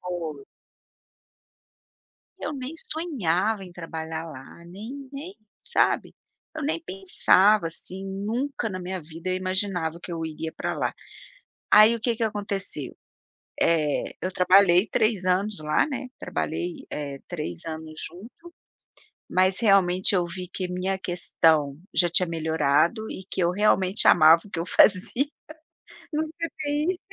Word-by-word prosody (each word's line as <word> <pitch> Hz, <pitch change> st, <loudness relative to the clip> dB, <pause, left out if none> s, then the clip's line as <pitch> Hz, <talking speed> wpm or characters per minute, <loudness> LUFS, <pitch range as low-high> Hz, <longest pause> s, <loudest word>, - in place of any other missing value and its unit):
Foi. 165 Hz, -6 st, -5 dB, 1.9 s
Eu 300 Hz, -, -4 dB
nem 270 Hz, +2 st, -6 dB, 0.2 s
sonhava 220 Hz, -, -1 dB
em 180 Hz, -, -12 dB
trabalhar 160 Hz, -1 st, -6 dB
lá, 140 Hz, +5 st, -12 dB
nem 230 Hz, +10 st, -9 dB
nem, 320 Hz, +8 st, -7 dB, 0.3 s
sabe? -, -, +1 dB, 0.4 s
Eu 315 Hz, -, -5 dB
nem 310 Hz, +3 st, -1 dB
pensava 195 Hz, -, +3 dB
assim, 185 Hz, +3 st, -5 dB
nunca 225 Hz, +6 st, -3 dB
na 185 Hz, -2 st, -5 dB
minha 185 Hz, +1 st, -4 dB
vida 165 Hz, +3 st, -7 dB
eu 185 Hz, -, +1 dB
imaginava 185 Hz, -3 st, -1 dB
que 175 Hz, -, -7 dB
eu 165 Hz, -1 st, -3 dB
iria 160 Hz, 0 st, -5 dB
para -, -, -3 dB
lá. -, -, -1 dB, 0.8 s
Aí 215 Hz, +2 st, +8 dB
o 230 Hz, -, -5 dB
que 230 Hz, 0 st, 0 dB
que 230 Hz, -, -4 dB
aconteceu? 200 Hz, -9 st, -3 dB, 0.7 s
Eh, 155 Hz, -3 st, +1 dB
eu 185 Hz, -, -2 dB
trabalhei 185 Hz, +1 st, +5 dB
3 215 Hz, -4 st, +1 dB
anos 190 Hz, +1 st, +1 dB
lá, 150 Hz, 0 st, +2 dB
né, 270 Hz, -3 st, -5 dB
trabalhei, 345 Hz, -6 st, -4 dB
eh, 140 Hz, -2 st, -5 dB
3 150 Hz, -, -5 dB
anos 160 Hz, -1 st, -7 dB
junto, 235 Hz, -, -14 dB, 0.8 s
mas, 185 Hz, +1 st, +3 dB
realmente, 195 Hz, -2 st, +4 dB
eu 175 Hz, -2 st, +2 dB
vi 180 Hz, +1 st, -6 dB
que 185 Hz, -2 st, -3 dB
minha 190 Hz, +1 st, -2 dB
questão 160 Hz, -5 st, +1 dB, 0.2 s
já 175 Hz, -2 st, +3 dB
tinha 180 Hz, 0 st, +3 dB
melhorado 160 Hz, +6 st, +1 dB
e 190 Hz, -, -7 dB
que -, -, -2 dB
eu 170 Hz, -, +3 dB
realmente 195 Hz, +1 st, +3 dB
amava 160 Hz, 0 st, +7 dB
o -, -, -15 dB
que 165 Hz, -, -3 dB
eu 170 Hz, -, -3 dB
fazia 185 Hz, -3 st, +4 dB, 1.0 s
no 305 Hz, +1 st, 0 dB
CTI. 310 Hz, +1 st, -2 dB
185 Hz, 140 wpm, -25 LUFS, 165-220 Hz, 1.9 s, Aí